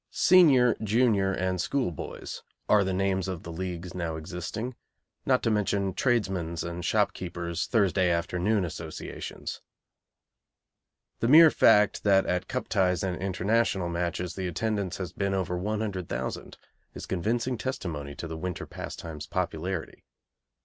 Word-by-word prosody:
Senior, 140 - +5
junior, 105 -3 +3
and 95 -1 -1
school 130 -2 0
boys' 80 - -7 0.3
are 105 -1 +5
the 95 - -1
names 95 0 0
of 95 -3 -4
the 85 - -7
leagues 90 0 -5
now 85 -3 -3
existing, 90 +9 -5 0.5
not 130 -1 +3
to 115 - +2
mention 100 -2 0
tradesmen's 95 -9 0
and 85 +1 -5
shopkeepers' 85 -1 -1
Thursday 95 -5 +2
afternoon 90 +4 +1
associations. 80 -1 -6 1.6
The 115 - +1
mere 155 +4 +9
fact 105 0 +4
that 95 -2 +4
at 90 0 -1
Cup 125 - -3
ties 90 -4 +1
and 95 -2 -1
International 95 0 +1
matches 85 +1 -2
the 95 -1 -3
attendance 100 0 -2
has 90 -2 -5
been 100 -1 -1
over 95 -2 -1
100,000 100 -1 -3 0.4
is - - -6
convincing 115 +6 -1
testimony 80 - -4
to 85 - -6
the 80 0 -6
winter 90 +1 -4
pastime's 75 -3 -7
popularity. 85 +1 -3
95 Hz, 135 wpm, -28 LUFS, 85-105 Hz, 1.6 s, mere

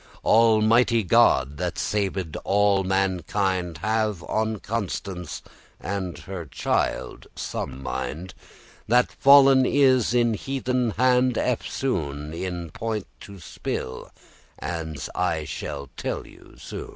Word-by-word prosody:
Almighty 115 +1 +4
God, 70 -5 +3
that - - -3
saved 95 -5 -2
all 100 -1 +2
mankind, 95 -2 0
Have 110 -4 0
on 110 0 -1
Constance 95 -5 -4 0.4
and 95 0 -4
on - - -12
her 90 -4 -7
child - - -2
some 65 +1 -5
mind, 85 +6 -4 0.5
That 125 +2 +3
fallen 135 -1 +7
is 130 -3 +3
in 120 -2 +3
heathen 125 +1 -1
hand 125 0 +3
eftsoon* 80 - -2
*again 85 +2 -4
*In 85 - -9
point 110 0 -3
to 100 -1 -11
spill,* 65 -5 -5 0.5
as 80 -5 -5
I - - 0
shall 70 -1 -6
tell - - -3
you - - -17
soon! - - -8
100 Hz, 115 wpm, -24 LUFS, 85-115 Hz, 0.5 s, fallen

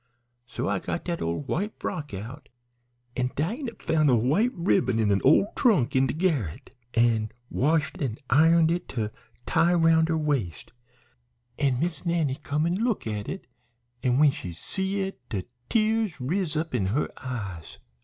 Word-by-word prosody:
So 125 - -3
I 100 -1 0
got 170 - -4
dat 170 -1 -2
ole 85 - -1
white 195 +9 -2
frock 150 -2 -4
out, 115 +9 -8 0.7
an' 125 0 0
Dinah 230 - -2
found 155 -2 +2
a 125 - +5
white 145 - +2
ribbon 125 - +2
in 110 -2 +2
a 100 - +2
ole 205 - +4
trunk 165 - +3
in 130 0 +4
de - - -2
garret, 145 - -1 0.2
an' 115 -2 +3 0.2
washed 155 +4 +1
an' 125 -6 -1
ironed 160 +3 +5
it 175 +1 -2
to 110 -2 -1 0.3
tie 175 +1 +3
'round 165 -1 +4
her 160 - +2
waist, 140 - -2 0.9
an' 135 -4 +2
Miss 165 -1 -2
Nannie 165 -6 0
come 150 +2 0
an' 180 +6 0
look 235 -4 0
at 105 -2 -3
it, 190 - -6 0.6
an' 125 -1 +2
when 150 0 +6
she 90 -9 -7
see 190 - -3
it 195 0 -4
de 100 -5 -2 0.3
tears 220 -6 +1
riz 160 +4 -1
up 160 -1 -2
in 100 -7 +1
her 125 +10 0
eyes. 100 -10 -6
150 Hz, 170 wpm, -26 LUFS, 120-170 Hz, 0.9 s, when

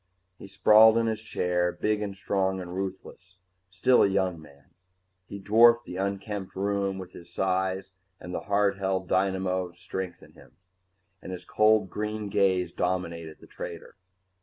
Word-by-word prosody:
He - - -10
sprawled 110 +3 +6
in 115 - +2
his 110 -1 -2
chair, 90 -5 0
big 105 +2 -1
and 100 -2 -4
strong 95 -1 -1
and 90 -1 -7
ruthless, 95 -1 -7 0.3
still 110 +7 +3
a - - +5
young 95 -4 -1
man. 70 -2 -18 0.6
He 100 - -7
dwarfed 115 +4 +5
the 90 - -7
unkempt 100 0 -4
room 100 0 -1
with 95 -2 -8
his 85 0 -13
size 95 +1 -1 0.3
and 90 - -8
the - - -2
hard 100 -1 +2
held 95 -1 -1
dynamo 95 -1 0
strength 90 0 -6
in - - -16
him, - - -18 0.7
and - - -8
his 90 - -7
cold 110 -3 +3
green 105 0 -4
gaze 95 -2 +1
dominated 85 -3 -3
the - - -13
trader. - - -9
95 Hz, 160 wpm, -27 LUFS, 90-100 Hz, 0.7 s, sprawled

